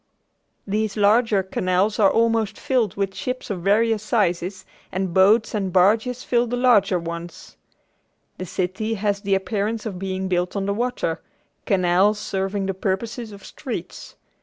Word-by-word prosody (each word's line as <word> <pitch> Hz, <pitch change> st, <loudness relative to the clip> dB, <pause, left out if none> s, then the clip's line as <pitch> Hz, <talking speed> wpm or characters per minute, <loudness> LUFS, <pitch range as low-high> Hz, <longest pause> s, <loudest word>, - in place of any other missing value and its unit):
These 210 Hz, +1 st, -1 dB
larger 210 Hz, -1 st, +3 dB
canals 185 Hz, +3 st, 0 dB
are 200 Hz, -2 st, +6 dB
almost 225 Hz, -2 st, +1 dB
filled 250 Hz, -5 st, 0 dB
with 195 Hz, -1 st, -2 dB
ships 255 Hz, 0 st, -4 dB
of 185 Hz, -3 st, -4 dB
various 215 Hz, +3 st, +2 dB
sizes 190 Hz, -3 st, -1 dB, 0.3 s
and 190 Hz, -2 st, -2 dB
boats 210 Hz, +5 st, +4 dB
and 195 Hz, -3 st, -1 dB
barges 220 Hz, +7 st, +2 dB
fill 240 Hz, 0 st, +1 dB
the 245 Hz, +1 st, -2 dB
smaller 210 Hz, -7 st, +4 dB
ones. 170 Hz, 0 st, -8 dB, 0.8 s
The 185 Hz, -, -5 dB
city 190 Hz, +6 st, -2 dB
has 200 Hz, -1 st, -1 dB
the 195 Hz, -1 st, +1 dB
appearance 210 Hz, +3 st, -2 dB
of 195 Hz, -5 st, -5 dB
being 190 Hz, 0 st, -3 dB
built 180 Hz, 0 st, -1 dB
on 195 Hz, -1 st, -1 dB
the 200 Hz, -, 0 dB
water, 230 Hz, -7 st, -2 dB, 0.5 s
canals 190 Hz, +2 st, +3 dB
serving 195 Hz, -1 st, -2 dB
the 195 Hz, -, -1 dB
purposes 215 Hz, +5 st, -3 dB
of 200 Hz, -1 st, -12 dB
streets. -, -, -7 dB
200 Hz, 150 wpm, -22 LUFS, 190-220 Hz, 0.8 s, are